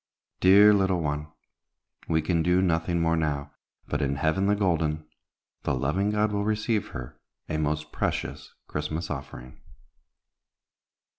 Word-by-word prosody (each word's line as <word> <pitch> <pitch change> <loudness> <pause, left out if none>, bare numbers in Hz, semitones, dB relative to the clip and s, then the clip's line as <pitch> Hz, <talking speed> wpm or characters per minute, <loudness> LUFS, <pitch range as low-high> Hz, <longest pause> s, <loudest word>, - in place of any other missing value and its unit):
Dear 100 +3 +7
little 95 -3 +2
one! 75 -1 -3 0.8
We 80 -1 +1
can 85 -3 +1
do 90 +2 +3
nothing 85 -1 +1
more 85 0 +2
now, 70 -3 -1 0.4
but 75 - -2
in 70 -1 0
Heaven 80 +7 +1
the 105 - +3
Golden 80 -6 0 0.6
the - - 0
loving 75 +11 0
God 105 0 +1
will 100 0 -1
receive 110 0 0
her, 65 -1 -8 0.3
a 75 - -2
most 75 0 -2
precious - - -3
Christmas 75 +3 -4
offering! 65 -3 -8
80 Hz, 135 wpm, -27 LUFS, 75-95 Hz, 0.8 s, Dear